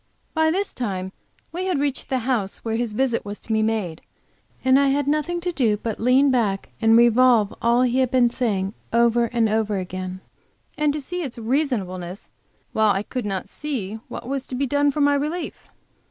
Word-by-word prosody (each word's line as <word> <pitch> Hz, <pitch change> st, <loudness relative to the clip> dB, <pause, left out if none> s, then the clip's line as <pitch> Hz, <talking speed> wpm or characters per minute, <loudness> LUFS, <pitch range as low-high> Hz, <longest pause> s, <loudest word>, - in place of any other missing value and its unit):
By 315 Hz, -1 st, +3 dB
this 385 Hz, +5 st, -1 dB
time 190 Hz, -6 st, -3 dB, 0.4 s
we 360 Hz, +3 st, -3 dB
had 365 Hz, -, +1 dB
reached 280 Hz, -1 st, -2 dB
the 260 Hz, -, +1 dB
house 230 Hz, -7 st, -1 dB
where 225 Hz, 0 st, -1 dB
his 230 Hz, -2 st, -2 dB
visit 245 Hz, 0 st, 0 dB
was 205 Hz, 0 st, -7 dB
to 225 Hz, -, -3 dB
be 220 Hz, -, +2 dB
made, 215 Hz, -7 st, -1 dB, 0.6 s
and 260 Hz, +1 st, +6 dB
I 280 Hz, -, +3 dB
had 280 Hz, +1 st, +1 dB
nothing 305 Hz, +4 st, 0 dB
to 355 Hz, +1 st, -1 dB
do 235 Hz, -10 st, +1 dB
but 220 Hz, 0 st, -4 dB
lean 260 Hz, +4 st, +4 dB
back 210 Hz, -6 st, 0 dB
and 225 Hz, 0 st, +6 dB
revolve 235 Hz, -2 st, +5 dB
all 235 Hz, +2 st, +3 dB
he 250 Hz, +1 st, +2 dB
had 260 Hz, -2 st, +2 dB
been 245 Hz, -2 st, +3 dB
saying, 205 Hz, -6 st, -1 dB, 0.2 s
over 235 Hz, 0 st, +3 dB
and 230 Hz, -1 st, +1 dB
over 215 Hz, -1 st, 0 dB
again, 185 Hz, 0 st, -5 dB, 0.5 s
and 300 Hz, -1 st, +2 dB
to 300 Hz, -, -3 dB
see 355 Hz, +6 st, -4 dB
its 270 Hz, -8 st, -5 dB
reasonableness 215 Hz, -, -2 dB, 0.4 s
while 220 Hz, -1 st, +4 dB
I 195 Hz, 0 st, 0 dB
could 250 Hz, +1 st, -4 dB
not 195 Hz, -2 st, -3 dB
see 225 Hz, -9 st, -4 dB
what -, -, -7 dB
was 270 Hz, 0 st, -3 dB
so 255 Hz, -, -5 dB
be 280 Hz, -, +1 dB
done 285 Hz, +2 st, +2 dB
for 290 Hz, +1 st, -1 dB
my 285 Hz, 0 st, +4 dB
relief. 300 Hz, +5 st, -3 dB
240 Hz, 195 wpm, -23 LUFS, 215-280 Hz, 0.6 s, and